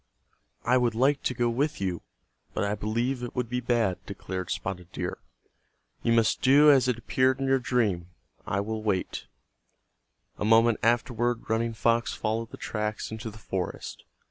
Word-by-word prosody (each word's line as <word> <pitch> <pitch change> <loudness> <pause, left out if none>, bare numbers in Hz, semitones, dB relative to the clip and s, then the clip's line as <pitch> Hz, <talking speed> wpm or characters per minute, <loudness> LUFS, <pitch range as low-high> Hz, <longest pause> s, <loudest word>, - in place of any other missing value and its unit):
"I 125 +2 +4
would 120 -2 +1
like 135 +4 +3
to 125 - -1
go 120 +1 +1
with 140 +6 0
you, 90 -4 -2 0.5
but - - 0
I 100 0 0
believe 115 +5 -1
it 120 - -6
would 125 -1 -1
be 125 0 -1
bad," 115 -6 0
declared 90 -2 -5
Spotted 90 -2 -4
Deer. - - -4 0.8
"You 115 - +1
must 115 -1 +3
do 145 +3 +7
as 130 -2 +4
it 125 -3 +1
appeared 130 +3 +1
in 135 - -1
your 135 0 +3
dream. 110 -9 0 0.4
I 100 - 0
will 110 +1 -3
wait." 100 -4 -2 1.1
A - - -1
moment 115 +1 +4
afterward 120 0 +1
Running 115 0 0
Fox 115 +1 +1
followed 110 +1 -2
the - - -10
tracks 105 -1 -3
into 110 +1 -5
the 110 - -12
forest. 95 -4 -5
115 Hz, 170 wpm, -27 LUFS, 105-125 Hz, 1.1 s, do